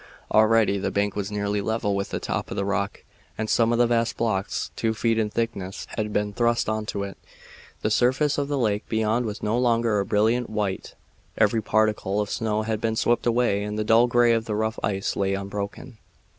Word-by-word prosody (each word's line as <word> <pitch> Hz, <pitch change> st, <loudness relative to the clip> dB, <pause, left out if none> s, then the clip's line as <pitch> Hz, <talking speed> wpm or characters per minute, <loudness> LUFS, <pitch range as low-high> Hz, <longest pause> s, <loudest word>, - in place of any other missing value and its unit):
Already 110 Hz, -2 st, +4 dB
the -, -, -1 dB
bank 100 Hz, 0 st, -1 dB
was 100 Hz, 0 st, -3 dB
nearly 100 Hz, 0 st, -1 dB
level 110 Hz, -1 st, -1 dB
with 100 Hz, 0 st, -2 dB
the -, -, -3 dB
top -, -, -3 dB
of -, -, -5 dB
the 100 Hz, -, 0 dB
rock, 100 Hz, 0 st, -2 dB, 0.3 s
and 110 Hz, -, -2 dB
some 115 Hz, +1 st, +3 dB
of 120 Hz, -, +2 dB
the 120 Hz, -, +5 dB
vast 115 Hz, -1 st, 0 dB
blocks, 100 Hz, -4 st, -1 dB
two 110 Hz, 0 st, -1 dB
feet 115 Hz, +1 st, +1 dB
in 110 Hz, -1 st, 0 dB
thickness, 105 Hz, -4 st, -3 dB
had 105 Hz, -1 st, -2 dB
been 105 Hz, 0 st, -1 dB
thrust 120 Hz, +1 st, +1 dB
on 110 Hz, 0 st, -2 dB
to 100 Hz, -2 st, -2 dB
it. 100 Hz, -1 st, -7 dB, 0.6 s
The 110 Hz, -, +1 dB
surface 130 Hz, +6 st, +2 dB
of 140 Hz, -, -1 dB
the 145 Hz, 0 st, -1 dB
lake 105 Hz, -4 st, -1 dB
beyond 110 Hz, +2 st, +1 dB
was 105 Hz, 0 st, -6 dB
no 110 Hz, +3 st, +1 dB
longer 115 Hz, -3 st, +2 dB
a 100 Hz, -, 0 dB
brilliant 115 Hz, +4 st, +1 dB
white. 105 Hz, -3 st, -3 dB, 0.4 s
Every 110 Hz, +1 st, +3 dB
particle 105 Hz, -2 st, +1 dB
of 105 Hz, -1 st, -2 dB
snow 110 Hz, -1 st, -1 dB
had 110 Hz, 0 st, -2 dB
been 110 Hz, -1 st, 0 dB
swept 120 Hz, +2 st, +1 dB
away 115 Hz, -4 st, +2 dB
and 105 Hz, +1 st, -4 dB
the 110 Hz, -, 0 dB
dull 115 Hz, +3 st, +5 dB
gray 120 Hz, 0 st, +4 dB
of 115 Hz, -1 st, 0 dB
the 110 Hz, -2 st, -2 dB
rough 110 Hz, +1 st, -1 dB
ice 95 Hz, -1 st, -1 dB
lay 100 Hz, 0 st, 0 dB
unbroken. 100 Hz, +4 st, -6 dB
110 Hz, 210 wpm, -25 LUFS, 100-115 Hz, 0.6 s, the